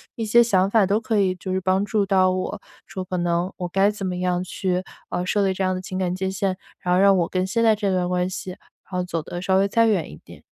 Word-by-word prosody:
一 225 Hz, -, -3 dB
些 235 Hz, +3 st, +5 dB
想 195 Hz, -4 st, +2 dB
法， 215 Hz, -1 st, +4 dB
都 200 Hz, +3 st, +1 dB
可 220 Hz, -2 st, 0 dB
以 185 Hz, -2 st, +2 dB
就 185 Hz, +1 st, -6 dB
帮 190 Hz, +1 st, +1 dB
助 205 Hz, 0 st, 0 dB
到 185 Hz, -1 st, +3 dB
我， 185 Hz, +2 st, -3 dB, 0.3 s
说 185 Hz, -, -5 dB
可 185 Hz, 0 st, -4 dB
能 175 Hz, +1 st, 0 dB
我 180 Hz, -, -3 dB
该 195 Hz, +3 st, +2 dB
怎 205 Hz, -2 st, -5 dB
么 180 Hz, -, -2 dB
样 180 Hz, 0 st, 0 dB
去， 185 Hz, 0 st, -2 dB, 0.3 s
呃， 180 Hz, -, -2 dB
设 200 Hz, +2 st, +1 dB
立 190 Hz, -, +1 dB
这 190 Hz, -, -5 dB
样 185 Hz, 0 st, +1 dB
的 185 Hz, -, -4 dB
情 185 Hz, 0 st, -6 dB
感 180 Hz, -1 st, -1 dB
界 190 Hz, 0 st, -2 dB
限， 190 Hz, -1 st, -1 dB, 0.2 s
然 180 Hz, -, 0 dB
后 -, -, +3 dB
让 195 Hz, -1 st, +5 dB
我 170 Hz, -2 st, +1 dB
跟 185 Hz, 0 st, 0 dB
现 230 Hz, +5 st, -1 dB
在 220 Hz, -1 st, +5 dB
这 205 Hz, -2 st, -1 dB
段 180 Hz, -1 st, 0 dB
关 180 Hz, 0 st, 0 dB
系， 185 Hz, 0 st, -6 dB
然 180 Hz, -, -11 dB, 0.3 s
后 180 Hz, -1 st, -1 dB
走 170 Hz, -2 st, -3 dB
得 175 Hz, +3 st, -7 dB
稍 190 Hz, 0 st, +2 dB
微 195 Hz, +1 st, +3 dB
再 230 Hz, +2 st, +3 dB
远 195 Hz, -7 st, 0 dB
一 75 Hz, -, -11 dB
点。 -, -, -14 dB
185 Hz, 295 characters per minute, -23 LUFS, 180-200 Hz, 0.3 s, 些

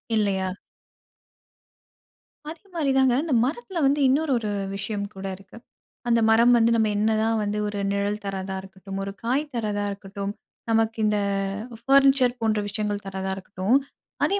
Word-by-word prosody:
இல்லையா? 195 Hz, -3 st, +1 dB, 2.0 s
அதே 320 Hz, 0 st, -9 dB
மாரிதாங்க. 270 Hz, -5 st, +3 dB
இந்த 320 Hz, -, -1 dB
மரத்துல 355 Hz, -, -3 dB
வந்து 285 Hz, +2 st, +3 dB
இன்னொரு 285 Hz, +3 st, +2 dB
ஒரு 215 Hz, -2 st, -3 dB, 0.2 s
விஷயம் 200 Hz, +1 st, -3 dB
கூட 195 Hz, 0 st, -5 dB
இருக்கு. 195 Hz, +3 st, -15 dB, 0.5 s
அந்த 235 Hz, -1 st, +4 dB
மரம் 235 Hz, +2 st, +6 dB
வந்து 230 Hz, 0 st, +4 dB
நம்ம 220 Hz, -1 st, +3 dB
என்னதான் 220 Hz, +1 st, +2 dB
வந்து 205 Hz, 0 st, -2 dB
ஒரு 205 Hz, -1 st, -3 dB
நிழல் 200 Hz, +1 st, -1 dB
தர்றதா 190 Hz, -1 st, -3 dB
இருக்கட்டும், 195 Hz, 0 st, -8 dB
ஒரு 195 Hz, -, -4 dB
காய் 260 Hz, +5 st, +1 dB
தர்றதா 210 Hz, -3 st, -1 dB
இருக்கட்டும், 200 Hz, 0 st, -5 dB, 0.4 s
நமக்கு 225 Hz, 0 st, +2 dB
இந்த 210 Hz, 0 st, +2 dB, 0.7 s
பர்னிச்சர் 270 Hz, -2 st, +5 dB
போன்ற 220 Hz, -1 st, +1 dB
விஷயங்கள் 205 Hz, 0 st, -2 dB
தர்றதா 190 Hz, 0 st, -3 dB
இருக்கட்டும். 195 Hz, +5 st, +1 dB, 0.5 s
அதே 400 Hz, -, +1 dB
215 Hz, 140 wpm, -25 LUFS, 200-245 Hz, 2.0 s, மரம்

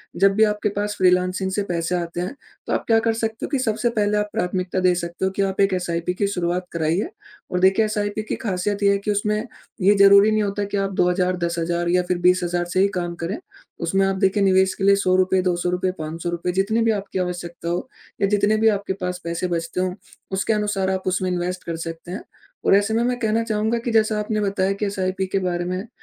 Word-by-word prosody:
जब 195 Hz, +2 st, +4 dB
भी 220 Hz, -, +5 dB
आपके 210 Hz, 0 st, +1 dB
पास 205 Hz, 0 st, -2 dB
फ्रीलांसिंग 185 Hz, +1 st, +2 dB
से 205 Hz, +2 st, 0 dB
पैसे 175 Hz, -2 st, -2 dB
आते 170 Hz, 0 st, -3 dB
हैं, 190 Hz, +10 st, -4 dB, 0.3 s
तो -, -, -1 dB
आप -, -, 0 dB
क्या 225 Hz, -1 st, +5 dB
कर 225 Hz, 0 st, +1 dB
सकते 225 Hz, 0 st, -3 dB
हो -, -, -7 dB
कि 275 Hz, -, 0 dB
सबसे 230 Hz, 0 st, 0 dB
पहले 210 Hz, 0 st, +2 dB
आप 210 Hz, 0 st, -1 dB
प्राथमिकता 185 Hz, -2 st, -1 dB
दे 180 Hz, -1 st, +4 dB
सकते 170 Hz, +1 st, -3 dB
हो 190 Hz, -, 0 dB
कि 195 Hz, -, -2 dB
आप 195 Hz, 0 st, -1 dB
एक 195 Hz, -1 st, +3 dB
एसआईपी 175 Hz, -1 st, -1 dB
की 200 Hz, +2 st, 0 dB
शुरुआत 180 Hz, -2 st, -1 dB
कराइए, 170 Hz, -, 0 dB, 0.4 s
और 180 Hz, -, 0 dB
देखिए 190 Hz, +4 st, +4 dB
एसआईपी 210 Hz, 0 st, -2 dB
की -, -, 0 dB
खासियत 200 Hz, +1 st, -1 dB
ये 200 Hz, -, +5 dB
है 200 Hz, -, +2 dB
कि 210 Hz, +1 st, -2 dB
उसमें 210 Hz, +1 st, 0 dB, 0.4 s
ये 200 Hz, +3 st, +5 dB
ज़रूरी 200 Hz, +2 st, +7 dB
नहीं 215 Hz, 0 st, +2 dB
होता 205 Hz, 0 st, -2 dB
कि -, -, +1 dB
आप 195 Hz, 0 st, -1 dB
2,000 180 Hz, 0 st, +1 dB
10,000 170 Hz, 0 st, -1 dB
या 180 Hz, +1 st, +3 dB
फिर 180 Hz, -, +1 dB
20,000 175 Hz, -1 st, +2 dB
से 185 Hz, -, +2 dB
ही 195 Hz, -, +5 dB
काम 175 Hz, 0 st, -4 dB
करें, 190 Hz, +6 st, -2 dB, 0.4 s
उसमें 195 Hz, +4 st, +1 dB
आप 195 Hz, -, 0 dB
देखिए 195 Hz, +1 st, +2 dB
निवेश 190 Hz, 0 st, +4 dB
के -, -, -5 dB
लिए 200 Hz, 0 st, +6 dB
₹100 185 Hz, 0 st, +3 dB
₹200 180 Hz, 0 st, 0 dB
₹500 170 Hz, +3 st, -3 dB
जितनी 200 Hz, +5 st, +1 dB
भी 225 Hz, -, +3 dB
आपकी 195 Hz, -2 st, -3 dB
आवश्यकता 175 Hz, -2 st, -4 dB
हो 175 Hz, +9 st, -2 dB, 0.3 s
या 200 Hz, -, +4 dB
जितने 205 Hz, +1 st, +2 dB
भी 225 Hz, +1 st, +3 dB
आपके 200 Hz, -1 st, -3 dB
पास 180 Hz, 0 st, -3 dB
पैसे 170 Hz, +2 st, -2 dB
बचते 170 Hz, +1 st, -2 dB
हों, 185 Hz, -1 st, -1 dB, 0.4 s
उसके 195 Hz, +3 st, 0 dB
अनुसार 205 Hz, -3 st, 0 dB
आप 190 Hz, 0 st, -3 dB
उसमें 185 Hz, 0 st, 0 dB
इन्वेस्ट 180 Hz, +1 st, -2 dB
कर 170 Hz, -, -4 dB
सकते 165 Hz, +2 st, -7 dB
हैं। 195 Hz, -, -5 dB, 0.4 s
और -, -, +6 dB
ऐसे 205 Hz, +2 st, +2 dB
में 230 Hz, +1 st, +2 dB
मैं 250 Hz, 0 st, 0 dB
कहना 220 Hz, -1 st, +1 dB
चाहूँगा 220 Hz, 0 st, 0 dB
कि 240 Hz, -, 0 dB
जैसा 220 Hz, -1 st, +2 dB
आपने 215 Hz, 0 st, -1 dB
बताया 195 Hz, -1 st, 0 dB
कि 210 Hz, -, 0 dB
एसआईपी 190 Hz, -1 st, -1 dB
के 195 Hz, +1 st, 0 dB
बारे 175 Hz, -2 st, -2 dB
में 185 Hz, +5 st, -3 dB
190 Hz, 230 wpm, -22 LUFS, 180-205 Hz, 0.4 s, ज़रूरी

